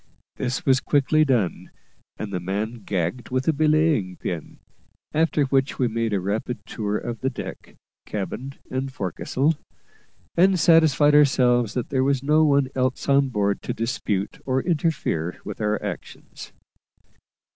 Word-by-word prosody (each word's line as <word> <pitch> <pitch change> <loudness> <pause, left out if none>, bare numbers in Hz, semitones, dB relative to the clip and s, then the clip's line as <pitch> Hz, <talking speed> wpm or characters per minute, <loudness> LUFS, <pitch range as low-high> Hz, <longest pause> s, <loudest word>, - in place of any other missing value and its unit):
This 125 -1 -2
was 130 -1 +4
quickly 145 +3 +2
done, 120 - 0 0.5
and 100 -2 -5
the 90 - -1
man 105 +6 -3
gagged 95 +5 -2
with 130 +1 -1
a 160 - +4
belaying 155 - +2
pin; 85 -3 -5 0.6
after 155 -1 +2
which 135 0 +1
we 125 - +2
made 115 0 -1
a 100 - +1
rapid 105 +6 -3
tour 105 -2 -2
of 120 0 -5
the 130 - 0
deck, - - -8 0.3
cabin, 120 +6 -4 0.2
and 135 +1 -2
forecastle, 130 - -1 0.8
and 185 +1 +4
satisfied 160 -3 +5
ourselves 125 -6 +4
that 125 - -2
there 130 -1 +1
was 135 -1 +1
no 155 +2 +4
one 140 -3 +3
else 130 0 -1
on 140 -1 +4
board 100 -4 0
to - - -4
dispute 110 -4 -2
or 130 0 0
interfere 150 - -1
with - - -6
our 105 0 +1
actions. - - -8
130 Hz, 145 wpm, -24 LUFS, 105-145 Hz, 0.8 s, satisfied